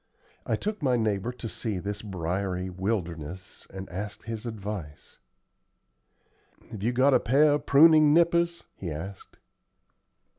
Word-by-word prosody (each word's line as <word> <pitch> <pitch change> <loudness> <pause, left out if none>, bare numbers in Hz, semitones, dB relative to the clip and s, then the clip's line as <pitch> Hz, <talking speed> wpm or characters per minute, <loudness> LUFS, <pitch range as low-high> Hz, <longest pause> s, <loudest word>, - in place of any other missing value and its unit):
I - - +2
took 215 -1 -4
my 130 -4 +2
neighbor 110 0 0
to 125 -2 -7
see 110 -2 -3
this 100 +3 -4
briery 95 -1 -3
wilderness, 90 -2 -4
and 95 0 -8
asked 100 +3 -6
his 115 0 -5
advice. 100 -8 -7 1.5
"Have 105 - -7
you 115 +4 +1
got 130 +3 +4
a - - +5
pair 145 +5 +4
of 145 - -2
pruning 155 +1 +7
nippers?" 170 +1 +3
he 90 - -6
asked. 85 +6 -8
105 Hz, 135 wpm, -27 LUFS, 95-135 Hz, 1.5 s, pruning